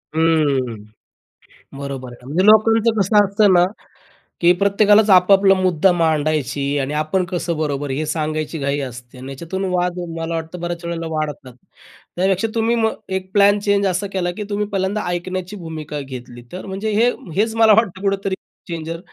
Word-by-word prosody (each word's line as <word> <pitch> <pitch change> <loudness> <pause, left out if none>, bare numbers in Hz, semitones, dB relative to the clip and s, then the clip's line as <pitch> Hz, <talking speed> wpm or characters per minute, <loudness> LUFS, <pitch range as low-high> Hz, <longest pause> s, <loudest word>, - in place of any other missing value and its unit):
हम्म. 150 -7 +1 1.0
बरोबर 135 -3 -6
आहे. 120 0 -15
म्हणजे 160 +8 0
लोकांचं 225 +1 +5
कसं 205 +2 +4
असतं 200 0 +3
ना 175 0 +5 0.8
की 170 +1 +6
प्रत्येकालाच 205 +1 +4
आपापला 195 +1 +5
मुद्दा 185 -1 +2
मांडायची 155 -5 0 0.2
आणि 135 +2 -2
आपण 180 +4 0
कसं 170 -2 -2
बरोबर 145 -2 -2
हे 155 +4 -2
सांगायची 155 0 -3
घाई 140 +1 -1
असते 125 -1 -9
अन् 130 +2 -9
याच्यातून 170 +8 -5
वाद 180 0 0 0.2
मला 165 +1 -3
वाटतं 165 +2 -5
बऱ्याच 175 0 -5
वेळेला 165 -1 -4
वाढतात. 150 -4 -4 0.6
त्यापेक्षा 190 +4 +1
तुम्ही 230 +1 +1
मग 220 -1 +1 0.2
एक 185 0 -9
प्लॅन 205 0 +5
चेंज 200 0 +1
असा 190 +2 -1
केला 175 -2 -1
की 210 - -3
तुम्ही 205 0 -1
पहिल्यांदा 200 +1 -1
ऐकण्याची 185 +2 -4
भूमिका 155 -4 -6
घेतली. 125 -2 -9
तर 185 - -7
म्हणजे 195 +3 -4
हे 235 +4 +4 0.3
हेच 220 +2 +1
मला 225 -1 +6
वाटतं 200 -4 +1
कुठेतरी 195 -1 -1 0.3
चेंजर 165 0 -5
175 Hz, 160 wpm, -19 LUFS, 155-200 Hz, 1.0 s, की